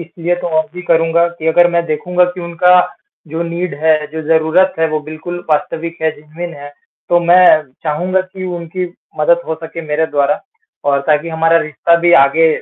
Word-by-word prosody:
इसलिए 170 +1 -3
तो - - -3
और 160 - 0
भी 180 - -7
करूँगा 165 0 +2
की 160 - -5
अगर 175 +2 +4
मैं 170 0 0
देखूँगा 180 +4 +1
की 180 - -7
उनका 180 +1 +4 0.5
जो 160 +3 -3
नीड 170 -1 -4
है, 155 -1 +2
जो 160 +1 -7
ज़रूरत 165 +4 +2
है 160 0 +2
वो 155 0 -2
बिल्कुल 155 +4 -7
वास्तविक 165 +2 -2
है 160 - +2
जेनुइन 165 +3 -8
है 145 0 -10 0.4
तो 175 0 +3
मैं 175 +2 +5 0.4
चाहूँगा 180 +5 0
की 185 0 -8
उनकी 170 +2 -5 0.3
मदद 170 +3 +3
हो 160 - -2
सके 165 +1 -7
मेरे 150 +2 0
द्वारा 145 +5 0 0.5
और 140 0 +2
ताकि 155 +1 +1
हमारा 165 +1 +2
रिश्ता 155 +2 +1
भी 175 0 +3
आगे 160 +4 +3
165 Hz, 185 wpm, -15 LUFS, 155-175 Hz, 0.5 s, मैं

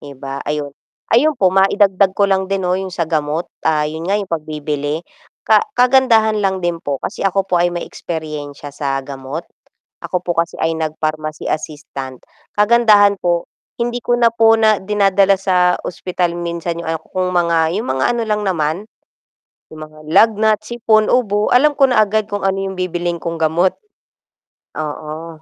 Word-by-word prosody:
'di 140 -2 -11
ba 135 +1 -6
ayun. 150 -1 -3 0.4
Ayun 295 +5 +4
po 190 -5 +2
maidagdag 195 0 +3
ko 200 - +3
lang 190 -1 +1
din 195 -1 -1
'no 180 - +1
'yung 190 +1 -2
sa 175 -2 -2
gamot, 155 +1 -1 0.2
ah, 150 -1 +2
'yun 160 +3 -5
nga 200 - +2
'yung 200 -4 -5
pagbibili. 150 0 -3 0.4
Ka - - +5 0.2
kagandahan 240 -4 +4
lang 190 -2 -1
din 170 -1 -1
po, 140 -1 -2
kasi - - -5
ako 195 0 +1
po 175 -3 +1
ay 175 - +3
may 175 0 -4
eksperyensya 150 -3 -7
sa 140 -1 -2
gamot. 135 +4 -6 0.6
Ako 180 - -1
po 175 -1 -3
kasi 170 0 -1
ay 165 0 0
nag 155 -1 -4
pharmacy 155 0 -3
assistant. 140 -4 -5 0.4
Kagandahan 210 -2 +5
po, 175 -1 0 0.3
hindi 240 +1 -1
ko 240 - +2
na 230 -1 +4
po 225 -1 +5
na 215 -2 +4
dinadala 195 -1 +3
sa 180 -2 +2
ospital 180 -1 -2
minsan 170 0 -4
'yung 160 - -5 0.2
kung 185 -1 0
mga, 170 -2 +2
'yung 220 +4 -3
mga 130 0 0
ano 235 - -1
lang 210 0 0
naman, 155 -4 0 1.0
'yung 155 - -10
mga 155 0 -18
lagnat, 220 +1 +4
sipon, 220 -2 +2
ubo. 210 -4 +1
Alam 295 +4 +5
ko 275 - +5
na 220 -4 +4
agad 215 0 0
kung 205 -1 -4
ano 195 0 +1
'yung 195 0 -3
bibilhin 175 -1 -2
kong 170 0 -3
gamot. 165 +4 +2 1.1
Oo. 155 +1 -6
180 Hz, 170 wpm, -17 LUFS, 155-205 Hz, 1.1 s, Ka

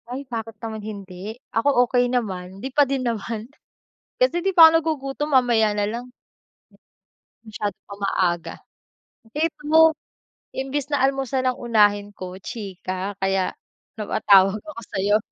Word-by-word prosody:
Ay, 265 +3 -5
bakit 225 -3 -6
naman 220 -1 -5
hindi. 200 0 -8 0.2
Ako, 245 +1 +3
okey 245 0 +1
naman. 190 -7 -3
Hindi 255 +7 -5
pa 290 - +5
din 270 -2 -1
naman. 225 0 -3 0.7
Kasi 350 -9 +3
'di 390 - +2
pa 325 -2 +10
ako - - -1
nagugutom, 295 -2 -3
mamaya 235 -5 +4
na 205 - +1
lang. 235 +3 -5 1.4
Masyadong 210 -2 -5
pang 200 0 -10
maaga. 175 -3 0 0.8
Hate 315 +2 -1
mo, 320 +1 +6 0.6
imbis 270 +1 -3
na 285 - +2
almusan 270 -1 0
ang 250 - -3
unahin 205 -3 +2
ko, 185 0 -7
chika. 195 -3 -5
Kaya 195 -1 0 0.5
napatawag 200 -1 +4
ako 305 -7 -9
sa'yo. 200 +2 +3
225 Hz, 135 wpm, -23 LUFS, 200-270 Hz, 1.4 s, pa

